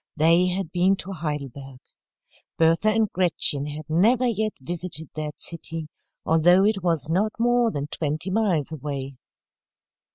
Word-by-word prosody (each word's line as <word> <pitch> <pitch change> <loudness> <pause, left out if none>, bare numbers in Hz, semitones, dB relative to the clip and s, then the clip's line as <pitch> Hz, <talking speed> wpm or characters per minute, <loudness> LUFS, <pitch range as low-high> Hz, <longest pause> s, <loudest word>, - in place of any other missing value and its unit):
They 165 +3 +4
had 180 -2 -2
been 180 +2 +3
to 195 0 -8
Heidelberg. 140 -6 -5 0.8
Bertha 165 +5 +3
and 220 0 +2
Gretchen 160 -5 +1
had 150 0 -6
never 220 +11 +3
yet 220 -2 0
visited 160 +2 -5
that 150 -1 -5
city, 165 -2 -5 0.4
although 175 +4 +5
it 210 -2 +1
was 165 -5 0
not 195 +7 0
more 240 0 +3
than 145 -9 -3
twenty 155 +4 -3
miles 185 -9 +1
away. 140 -3 -5
165 Hz, 135 wpm, -24 LUFS, 150-195 Hz, 0.8 s, although